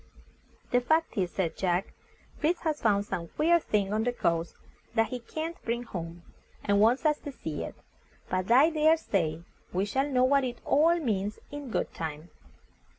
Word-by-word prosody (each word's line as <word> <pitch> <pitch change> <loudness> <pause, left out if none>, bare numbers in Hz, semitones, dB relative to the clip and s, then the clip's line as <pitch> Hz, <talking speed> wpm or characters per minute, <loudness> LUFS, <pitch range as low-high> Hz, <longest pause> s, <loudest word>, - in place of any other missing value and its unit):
"The 245 - +4
fact 315 +6 +1
is," 185 -3 0
said 175 -3 -2
Jack, 180 0 0 0.5
"Fritz 330 +3 +1
has 310 -2 -1
found 205 -2 +2
some 170 -4 -4
queer 340 - +3
thing 205 -8 0
on 215 +1 +1
the 245 - +1
coast 170 -7 -1 0.4
that 225 -1 +3
he 250 - -4
can't 320 +8 -5
bring 235 +1 -2
home, 170 -6 -7 0.4
and 200 -1 +2
wants 235 +8 +4
us 300 -1 +3
to 290 - -7
see 160 - -5
it. - - -7 0.5
But 185 +1 -2
I 280 +7 +6
dare 315 +1 +4
say 165 - -1 0.3
we 185 +2 0
shall 270 +7 0
know 255 -2 +3
what 275 +1 +4
it 245 -2 -3
all 320 +4 +4
means 210 - -1
in 290 -2 -6
good - - -2
time." 160 0 -6
230 Hz, 180 wpm, -29 LUFS, 185-290 Hz, 0.5 s, I